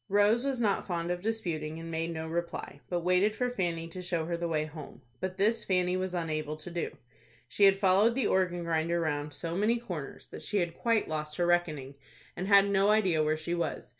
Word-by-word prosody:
Rose 205 Hz, +4 st, +4 dB
was 270 Hz, -3 st, 0 dB
not 210 Hz, -4 st, +1 dB
fond 170 Hz, -2 st, -2 dB
of 180 Hz, 0 st, -2 dB
disputing, 165 Hz, -8 st, -3 dB
and 165 Hz, 0 st, -7 dB
made 165 Hz, +1 st, -2 dB
no 160 Hz, -1 st, -4 dB
reply, 170 Hz, +1 st, -4 dB
but 175 Hz, -1 st, -1 dB
waited 185 Hz, +5 st, +3 dB
for 250 Hz, +2 st, 0 dB
Fanny 170 Hz, -7 st, -2 dB
to 180 Hz, +2 st, -7 dB
show 175 Hz, -3 st, -1 dB
her 170 Hz, +1 st, -2 dB
the 170 Hz, 0 st, -2 dB
way 155 Hz, -2 st, 0 dB
home. 155 Hz, -3 st, -10 dB, 0.2 s
But 185 Hz, +3 st, -4 dB
this 215 Hz, +3 st, +2 dB
Fanny 180 Hz, -1 st, +1 dB
was 185 Hz, 0 st, -2 dB
unable 155 Hz, -3 st, -2 dB
to 175 Hz, +3 st, -9 dB
do. 170 Hz, -1 st, -3 dB, 0.5 s
She 200 Hz, +11 st, +3 dB
had 195 Hz, 0 st, +6 dB
followed 200 Hz, +4 st, +4 dB
the 265 Hz, -4 st, +1 dB
organ 180 Hz, -3 st, +1 dB
grinder 170 Hz, +1 st, 0 dB
round 150 Hz, -2 st, -1 dB
so 165 Hz, +4 st, -5 dB
many 215 Hz, +5 st, +2 dB
corners 175 Hz, -, -7 dB
that -, -, -8 dB
she 210 Hz, -, -2 dB
had 170 Hz, -3 st, 0 dB
quite 230 Hz, -2 st, +1 dB
lost 155 Hz, -1 st, -3 dB
her 175 Hz, -, +2 dB
reckoning, 155 Hz, -6 st, 0 dB, 0.4 s
and 185 Hz, -, -3 dB
had 200 Hz, -1 st, +7 dB
no 200 Hz, 0 st, +3 dB
idea 190 Hz, -7 st, +3 dB
where 155 Hz, 0 st, +1 dB
she 160 Hz, +2 st, -3 dB
was. 170 Hz, -1 st, -2 dB
175 Hz, 220 wpm, -30 LUFS, 160-200 Hz, 0.5 s, had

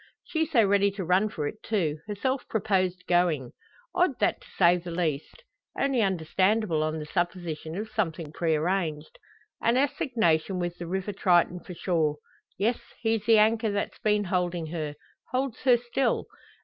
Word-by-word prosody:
She 320 Hz, -1 st, -1 dB
so 240 Hz, -9 st, +4 dB
ready 200 Hz, 0 st, +3 dB
to 195 Hz, -3 st, -4 dB
run 185 Hz, +5 st, +3 dB
for 155 Hz, -8 st, -4 dB
it, 215 Hz, +8 st, -7 dB
too 165 Hz, -9 st, -1 dB
herself 255 Hz, +6 st, -2 dB
proposed 185 Hz, -4 st, 0 dB
going! 170 Hz, -8 st, +1 dB, 0.4 s
Odd, -, -, +2 dB
that -, -, +1 dB
to -, -, -16 dB
say 175 Hz, +1 st, +5 dB
the 175 Hz, 0 st, -8 dB
least. 170 Hz, -, -3 dB, 0.4 s
Only 275 Hz, -3 st, +2 dB
understandable 190 Hz, 0 st, +1 dB
on 155 Hz, +1 st, -1 dB
the 155 Hz, -, -5 dB
supposition 175 Hz, -1 st, -3 dB
of 215 Hz, +2 st, -3 dB
something 165 Hz, -9 st, -2 dB
prearranged. 160 Hz, -1 st, -1 dB, 0.4 s
An 235 Hz, +2 st, +3 dB
assignation 230 Hz, -, +1 dB
with 175 Hz, -1 st, -3 dB
the 175 Hz, -, -5 dB
River 190 Hz, +3 st, -2 dB
Triton 180 Hz, -2 st, +3 dB
for 180 Hz, -, -10 dB
sure! 160 Hz, -5 st, +1 dB, 0.4 s
Yes; 225 Hz, +5 st, +1 dB, 0.2 s
he's 225 Hz, -2 st, 0 dB
the 225 Hz, -1 st, +7 dB
anchor 220 Hz, +1 st, +3 dB
that's 205 Hz, 0 st, -3 dB
been 210 Hz, -1 st, +2 dB
holding 180 Hz, -3 st, -1 dB
her 155 Hz, -3 st, -4 dB, 0.4 s
holds 260 Hz, -1 st, -2 dB
her 250 Hz, -2 st, +6 dB
still. 245 Hz, +3 st, 0 dB
185 Hz, 160 wpm, -27 LUFS, 170-220 Hz, 0.4 s, the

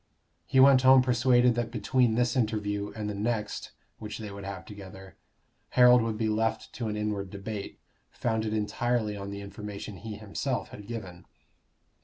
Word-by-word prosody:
He 130 Hz, -, +3 dB
went 135 Hz, -1 st, +7 dB
home 130 Hz, 0 st, +7 dB
persuaded 125 Hz, 0 st, +4 dB
that 120 Hz, -1 st, -2 dB
between 120 Hz, 0 st, +1 dB
this 120 Hz, +2 st, +1 dB
interview 105 Hz, -4 st, -1 dB
and 105 Hz, -1 st, -4 dB
the 105 Hz, -, -3 dB
next 105 Hz, 0 st, -2 dB, 0.3 s
which 105 Hz, -1 st, -6 dB
they 105 Hz, -2 st, -7 dB
would 100 Hz, 0 st, -8 dB
have 100 Hz, -1 st, -6 dB
together, 95 Hz, -2 st, -11 dB, 0.6 s
Harold 125 Hz, 0 st, +8 dB
would 115 Hz, -1 st, -2 dB
be 110 Hz, 0 st, 0 dB
left 110 Hz, +1 st, -1 dB
to 120 Hz, -3 st, -4 dB
an 105 Hz, 0 st, -2 dB
inward 105 Hz, -2 st, -2 dB
debate, 100 Hz, +1 st, -6 dB, 0.3 s
founded 110 Hz, -2 st, -1 dB
entirely 110 Hz, +1 st, 0 dB
on 100 Hz, 0 st, -6 dB
the 100 Hz, 0 st, -6 dB
information 100 Hz, 0 st, -7 dB
he 105 Hz, +3 st, -7 dB
himself 110 Hz, +5 st, -3 dB
had 105 Hz, -1 st, -11 dB
given. 95 Hz, -7 st, -7 dB
110 Hz, 165 wpm, -28 LUFS, 100-120 Hz, 0.6 s, Harold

